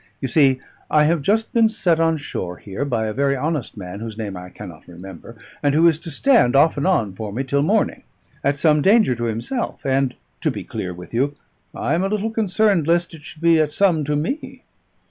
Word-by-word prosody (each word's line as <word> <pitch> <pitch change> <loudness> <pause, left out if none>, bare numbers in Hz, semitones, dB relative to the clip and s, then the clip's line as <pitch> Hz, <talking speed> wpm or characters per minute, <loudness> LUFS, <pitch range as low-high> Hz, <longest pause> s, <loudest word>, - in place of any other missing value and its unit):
"You 135 - -2
see, 135 0 +3 0.3
I 150 -1 +4
have 160 +1 +2
just 220 +8 0
been 230 -2 +4
set 175 -7 +1
on 165 -1 +2
shore 90 - -5
here 100 +9 -5
by 120 -5 -1
a 110 - -3
very 140 +2 +1
honest 145 -4 -3
man, 95 0 -7
whose 110 -1 -7
name 105 -4 -5
I 90 0 -8
cannot 90 -5 -11
remember, 90 +5 -11 0.3
and 145 -1 +1
who 165 +2 +5
is 160 -2 +2
to 170 - -9
stand 230 - +3
off 150 +4 +5
and 145 +4 -1
on 115 - +1
for 105 +2 -6
me 125 +6 -2
till 140 +1 0
morning, 205 +8 +1 0.4
at 140 +1 +1
some 150 0 +3
danger 205 - +4
to 120 0 -3
himself; 115 - -3
and, 135 -1 +1 0.3
to - - +1
be - - -5
clear 90 - -5
with 90 +3 -11
you, 140 +5 0 0.4
I 145 - -1
am 170 +3 +1
a - - +1
little 215 +2 -1
concerned 210 -5 +1
lest 170 +1 +1
it 160 - -11
should 160 +1 -12
be 165 -1 +5
at 150 -1 +1
some 175 -4 +2
to 150 +1 -1
me. 175 - -4
145 Hz, 220 wpm, -21 LUFS, 115-170 Hz, 0.4 s, who